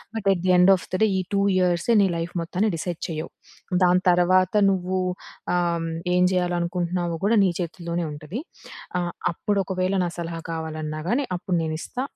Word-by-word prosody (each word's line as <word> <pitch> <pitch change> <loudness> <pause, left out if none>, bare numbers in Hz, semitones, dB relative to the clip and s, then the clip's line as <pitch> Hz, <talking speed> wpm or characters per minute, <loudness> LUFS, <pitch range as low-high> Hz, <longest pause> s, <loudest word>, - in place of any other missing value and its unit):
But, 215 -3 -3
at 175 - -4
the - - +5
end 190 +2 +7
of 180 - -11
the 185 - 0
day 220 - +4
ఈ - - +1
2 200 - +3 0.2
ఇయర్స్‌యే 180 +4 +2
నీ 190 - +2
life 165 +1 -4
మొత్తాన్ని 190 +5 0
డిసైడ్ 170 +1 -4
చేయవు. 160 0 -4 0.5
దాని 180 +1 +3
తర్వాత 185 +2 +3 0.2
నువ్వు 185 0 -1 0.6
ఆహ్, - - +2 0.2
హ్మ్, 165 0 -3 0.2
ఏం 180 - +4
చేయాలనుకుంటున్నావో 175 -1 -1
కూడా 220 +2 +4
నీ 185 - +2
చేతుల్లోనే 170 0 -3
ఉంటది. 155 - -6 0.6
ఆహ్, 175 0 -3 0.2
అప్పుడు 205 +3 -1
ఒకవేళ 185 0 -1
నా 175 - -1
సలహా 165 -1 -4
కావాలన్నా 155 -1 -4
గాని 260 +7 +1
అప్పుడు 180 +1 -2
నేనిస్తా. 160 +10 -4
175 Hz, 175 wpm, -24 LUFS, 170-185 Hz, 0.6 s, end